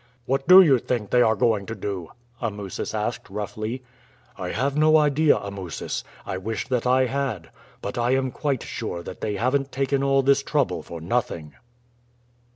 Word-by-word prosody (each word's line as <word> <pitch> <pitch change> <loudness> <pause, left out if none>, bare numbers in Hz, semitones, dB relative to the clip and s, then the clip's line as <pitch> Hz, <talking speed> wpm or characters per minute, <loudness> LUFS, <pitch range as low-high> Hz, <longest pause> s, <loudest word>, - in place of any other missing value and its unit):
"What 135 +2 -1
do 185 +2 +10
you 135 -7 +4
think 115 -4 -3
they 125 - +5
are 110 -2 +4
going 105 -2 +1
to 115 - -4
do?" 95 -4 -5 0.3
Amusis 105 -2 -4
asked 110 +1 -3
roughly. 110 +5 -4 0.5
"I 90 - -5
have 135 +7 -1
no 155 +1 +5
idea, 150 0 +4
Amusis. 100 -4 -5 0.2
I 95 - -3
wish 110 +4 -4
that 125 -1 0
I 130 +1 +4
had; 130 -9 -3 0.3
but 100 +4 -3
I 120 +2 +2
am 130 -1 0
quite 140 -2 -2
sure 85 0 -5
that 90 - -9
they 105 -1 -2
haven't 135 +6 0
taken 135 +1 0
all 135 0 +3
this 140 +1 +4
trouble 140 - 0
for 85 - -8
nothing." 85 -5 -2
120 Hz, 170 wpm, -24 LUFS, 100-135 Hz, 0.5 s, do